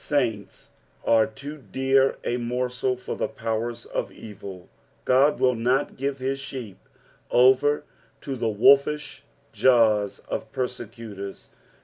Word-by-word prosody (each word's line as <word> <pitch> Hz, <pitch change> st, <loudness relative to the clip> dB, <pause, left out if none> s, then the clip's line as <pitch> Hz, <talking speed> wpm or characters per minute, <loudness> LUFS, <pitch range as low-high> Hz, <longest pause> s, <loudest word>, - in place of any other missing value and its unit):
Saints 115 Hz, -9 st, -2 dB, 0.3 s
are 110 Hz, -1 st, +4 dB
too 145 Hz, +7 st, -9 dB
dear 135 Hz, +2 st, +3 dB
a 120 Hz, -, -1 dB
morsel 125 Hz, +1 st, -1 dB
for 125 Hz, -, -5 dB
the -, -, -1 dB
powers 115 Hz, -2 st, -3 dB
of -, -, -3 dB
evil; 100 Hz, -4 st, -10 dB, 0.4 s
Ood 135 Hz, +4 st, +4 dB
will 130 Hz, -1 st, +4 dB
not 125 Hz, +4 st, 0 dB
give 140 Hz, +1 st, -2 dB
hia 135 Hz, +1 st, -2 dB
sheep 130 Hz, -7 st, -7 dB, 0.5 s
over 130 Hz, +4 st, +4 dB, 0.4 s
to 135 Hz, -, -4 dB
the 115 Hz, -2 st, -1 dB
wolfish 140 Hz, +7 st, +3 dB, 0.3 s
jaws 110 Hz, -5 st, +3 dB
of -, -, -4 dB
persecutors. 115 Hz, -5 st, -6 dB
125 Hz, 120 wpm, -25 LUFS, 115-135 Hz, 0.5 s, are